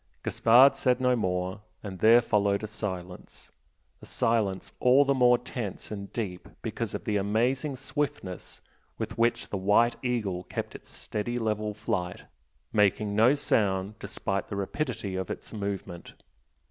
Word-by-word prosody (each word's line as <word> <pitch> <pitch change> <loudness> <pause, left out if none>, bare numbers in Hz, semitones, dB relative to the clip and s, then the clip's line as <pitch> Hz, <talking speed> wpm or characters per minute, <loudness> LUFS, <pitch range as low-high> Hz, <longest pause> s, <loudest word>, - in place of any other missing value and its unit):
Gaspard 125 +5 +6
said 125 -1 +2
no 125 -1 +3
more, 95 -2 -2 0.2
and 95 -3 -7
there 115 +4 +7
followed 100 -2 +1
a - - -1
silence, 95 -4 -6 0.5
a - - -12
silence 105 -5 0
all 130 +3 +5
the 140 - +3
more 125 -2 +5
tense 110 -5 -6
and 100 -2 -6
deep 95 -6 -5
because - - -3
of - - -5
the 105 - 0
amazing 120 +8 0
swiftness 135 - -4 0.4
with 100 - -5
which 120 +1 +1
the 100 - -2
"White 105 +5 +3
Eagle" 110 -8 -1
kept - - -5
its - - -12
steady 120 +3 -4
level 105 -2 -1
flight, 100 -5 -3 0.5
making 105 0 +2
no 115 +6 +5
sound 100 -7 +1
despite 100 -1 -3
the - - -5
rapidity 105 -1 -3
of 95 -1 -3
its - - -7
movement. 100 -4 -5
105 Hz, 145 wpm, -28 LUFS, 100-120 Hz, 0.5 s, there